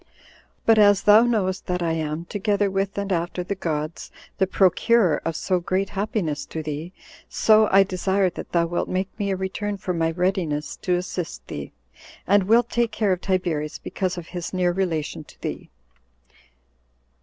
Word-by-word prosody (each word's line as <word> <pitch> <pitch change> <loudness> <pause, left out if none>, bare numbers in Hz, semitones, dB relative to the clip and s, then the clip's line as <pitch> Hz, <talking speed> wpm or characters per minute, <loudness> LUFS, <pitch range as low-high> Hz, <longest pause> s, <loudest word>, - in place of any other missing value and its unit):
But 225 -1 +5
as 205 -1 +5
thou 210 +1 +7
knowest 200 -6 0
that 180 -1 -1
I 165 - 0
am, 160 0 -3
together 205 +1 0
with 195 +1 -2
and 200 0 -2
after 175 0 -1
the 180 - -3
gods, 155 -4 -4 0.3
the 190 - +3
procurer 195 0 +3
of 165 - -2
so 180 +2 0
great 185 +3 -1
happiness 195 -7 -2
to 160 - -5
thee; 155 +3 -5 0.4
so 215 -1 +4
I 195 +1 +7
desire 190 0 0
that - - -8
thou 170 -1 +2
wilt 175 +1 -2
make 185 +1 -1
me 200 -1 -1
a 195 - +1
return 200 +2 -3
for 185 -1 -3
my 165 -1 +1
readiness 170 -3 -1
to 180 - 0
assist 180 -2 -4
thee, - - -7 0.5
and 200 0 +3
wilt 230 +3 +3
take 235 -1 +1
care 210 -3 0
of 180 - -4
Tiberius 170 -6 -1
because 185 -1 -3
of 170 -2 -7
his 175 0 -5
near 180 -1 +2
relation 165 -5 -2
to - - -19
thee. - - -5
185 Hz, 175 wpm, -23 LUFS, 170-200 Hz, 0.5 s, thou